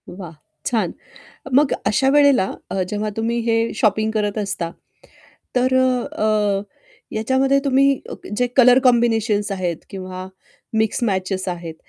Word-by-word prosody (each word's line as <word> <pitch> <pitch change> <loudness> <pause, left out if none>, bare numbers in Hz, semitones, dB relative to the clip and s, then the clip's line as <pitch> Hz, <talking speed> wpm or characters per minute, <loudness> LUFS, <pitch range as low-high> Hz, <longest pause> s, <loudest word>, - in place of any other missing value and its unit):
वाह, 175 -3 -9 0.3
छान. 215 -8 0 0.6
मग 280 +1 +4
अशा 265 +5 +2
वेळेला 280 -8 +4 0.2
अ, 190 - -1
जेव्हा 210 +1 -2
तुम्ही 230 +1 -1
हे 230 0 +1
शॉपिंग 215 +1 +1
करत 210 -1 -1
असता, 195 -5 -3 0.9
तर 255 +1 +2
अ, 215 -5 +1 0.5
याच्यामध्ये 265 +5 +2
तुम्ही 275 0 +4 0.2
अ, - - -4 0.2
जे 245 - +2
कलर 250 -1 +7
कॉम्बिनेशन्स 225 -4 +2
आहेत 180 -3 -2
किंवा 185 -1 -7 0.5
मिक्स 220 +3 0
मॅचेस 190 -2 -1
आहेत, 170 -2 -5
220 Hz, 125 wpm, -20 LUFS, 195-250 Hz, 0.9 s, कलर